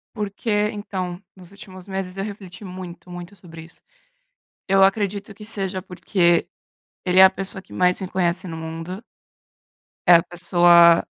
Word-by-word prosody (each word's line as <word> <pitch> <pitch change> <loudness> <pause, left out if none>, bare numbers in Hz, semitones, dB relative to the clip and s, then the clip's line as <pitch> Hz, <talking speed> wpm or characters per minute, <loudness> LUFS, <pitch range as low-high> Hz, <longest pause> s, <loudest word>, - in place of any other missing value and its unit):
Porque 210 +1 -5 0.2
então, 185 -4 -5
nos 185 -1 -16
últimos 190 -2 -12
meses 190 -1 -5
eu 195 - -2
refleti 200 -2 -9
muito, 180 -1 -9
muito, 175 +2 -9
sobre 165 -3 -12
isso. 165 - -16 0.9
Eu 195 0 +4
acredito 200 +1 0
que 210 +2 -13
seja 195 -3 -1
porque 175 -2 +1 0.6
ele 180 +1 +3
é - - +11
a 190 - +9
pessoa 195 +1 -6
que - - -17
mais 180 +1 +2
me 190 - -3
conhece 185 0 -1
no 165 - -6
mundo. 165 +5 -7 1.0
É 175 - +9
a 165 - +5
pessoa 175 -1 +5
185 Hz, 155 wpm, -22 LUFS, 175-195 Hz, 1.0 s, é